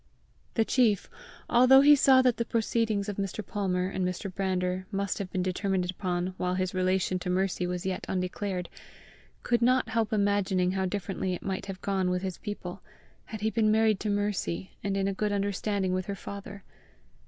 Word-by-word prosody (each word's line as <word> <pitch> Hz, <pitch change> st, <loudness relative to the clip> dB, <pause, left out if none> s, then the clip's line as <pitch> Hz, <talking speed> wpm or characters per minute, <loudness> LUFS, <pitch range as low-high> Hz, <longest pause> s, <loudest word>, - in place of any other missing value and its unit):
The 225 Hz, -, +3 dB
chief, 220 Hz, -7 st, +2 dB, 0.4 s
although 255 Hz, +3 st, +7 dB
he 295 Hz, +1 st, +8 dB
saw 265 Hz, -2 st, +6 dB
that 250 Hz, -2 st, +3 dB
the 235 Hz, -, +1 dB
proceedings 225 Hz, -2 st, 0 dB
of 205 Hz, -, -4 dB
Mr. 200 Hz, +1 st, -3 dB
Palmer 185 Hz, -3 st, -1 dB
and 190 Hz, -1 st, -2 dB
Mr. 180 Hz, +1 st, -3 dB
Brander 185 Hz, -1 st, -1 dB
must 200 Hz, 0 st, -2 dB
have 195 Hz, -2 st, -4 dB
been 185 Hz, -, -1 dB
determined 185 Hz, -1 st, -1 dB
upon 180 Hz, -1 st, -2 dB
while 180 Hz, 0 st, -1 dB
his 185 Hz, -1 st, -1 dB
relation 185 Hz, 0 st, +1 dB
to 180 Hz, -, -4 dB
Mercy 185 Hz, -1 st, 0 dB
was 180 Hz, +1 st, -3 dB
yet 190 Hz, -1 st, -2 dB
undeclared, 185 Hz, 0 st, -2 dB, 0.8 s
could 240 Hz, -1 st, +1 dB
not 250 Hz, 0 st, +3 dB
help 225 Hz, -1 st, 0 dB
imagining 200 Hz, -3 st, +2 dB
how 190 Hz, 0 st, 0 dB
differently 190 Hz, -1 st, -2 dB
it -, -, -10 dB
might 190 Hz, 0 st, -3 dB
have 195 Hz, -1 st, -7 dB
gone 190 Hz, -2 st, 0 dB
with 180 Hz, +1 st, -1 dB
his 185 Hz, -2 st, -4 dB
people, 205 Hz, -4 st, -6 dB, 0.4 s
had 220 Hz, -3 st, -7 dB
he 220 Hz, +1 st, +1 dB
been 220 Hz, -2 st, +2 dB
married 220 Hz, -2 st, +3 dB
to 215 Hz, -, -2 dB
Mercy, 205 Hz, -3 st, -1 dB
and 200 Hz, -1 st, -1 dB
in 195 Hz, 0 st, +1 dB
a 195 Hz, -, 0 dB
good 210 Hz, +2 st, -1 dB
understanding 200 Hz, -1 st, -1 dB
with 185 Hz, -1 st, -2 dB
her 200 Hz, -, -3 dB
father. 200 Hz, 0 st, -8 dB
195 Hz, 190 wpm, -28 LUFS, 185-210 Hz, 0.8 s, he